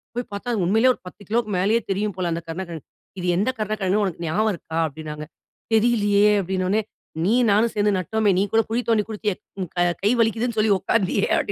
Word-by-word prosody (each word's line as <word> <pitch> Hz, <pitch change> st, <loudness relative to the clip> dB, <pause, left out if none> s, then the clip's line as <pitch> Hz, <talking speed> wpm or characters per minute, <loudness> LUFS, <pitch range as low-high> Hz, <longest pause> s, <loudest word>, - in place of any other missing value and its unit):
போய் 245 Hz, -, -2 dB
பார்த்தா! 200 Hz, +5 st, -5 dB
அது 200 Hz, -5 st, 0 dB
உண்மையிலயே 225 Hz, +7 st, +4 dB
ஒரு -, -, -16 dB
10 190 Hz, -, -12 dB
கிலோக்கு 225 Hz, -1 st, 0 dB
மேலயே 210 Hz, +5 st, +2 dB
தெரியும் 205 Hz, +1 st, -1 dB
போல 180 Hz, -2 st, -1 dB
அந்த 165 Hz, +1 st, -2 dB
கருணக்கிழங்கு. 165 Hz, -2 st, -6 dB, 0.3 s
"இது 180 Hz, -, -3 dB
எந்த 210 Hz, +7 st, +1 dB
கருணக்கிழங்கு 210 Hz, -1 st, 0 dB
உனக்கு 175 Hz, -3 st, -3 dB
ஞாபகம் 215 Hz, +7 st, +1 dB
இருக்கா?" 160 Hz, 0 st, -7 dB
அப்படின்னாங்க. 150 Hz, 0 st, -7 dB, 0.5 s
"தெரியிலயே!" 210 Hz, -2 st, +4 dB
அப்படின்ன 185 Hz, 0 st, -2 dB
உடனே 215 Hz, +2 st, +2 dB, 0.4 s
"நீயும் 235 Hz, +2 st, +3 dB
நானும் 220 Hz, +3 st, +3 dB
சேர்ந்து 205 Hz, 0 st, +2 dB
நட்டோமே, 210 Hz, +3 st, +1 dB
நீ -, -, +3 dB
கூட 225 Hz, -, +5 dB
குழி 240 Hz, +2 st, +1 dB
தோண்டி 215 Hz, -2 st, +3 dB
குடுத்தயே, 210 Hz, -2 st, -2 dB, 0.2 s
உன் 180 Hz, -3 st, -3 dB
க 175 Hz, 0 st, +3 dB, 0.2 s
கை 210 Hz, -, +4 dB
வலிக்குதுன்னு 225 Hz, +1 st, 0 dB
சொல்லி 215 Hz, -1 st, +3 dB
உட்காந்தியே" 195 Hz, 0 st, +1 dB
அப் -, -, -2 dB
205 Hz, 200 wpm, -23 LUFS, 185-220 Hz, 0.5 s, கூட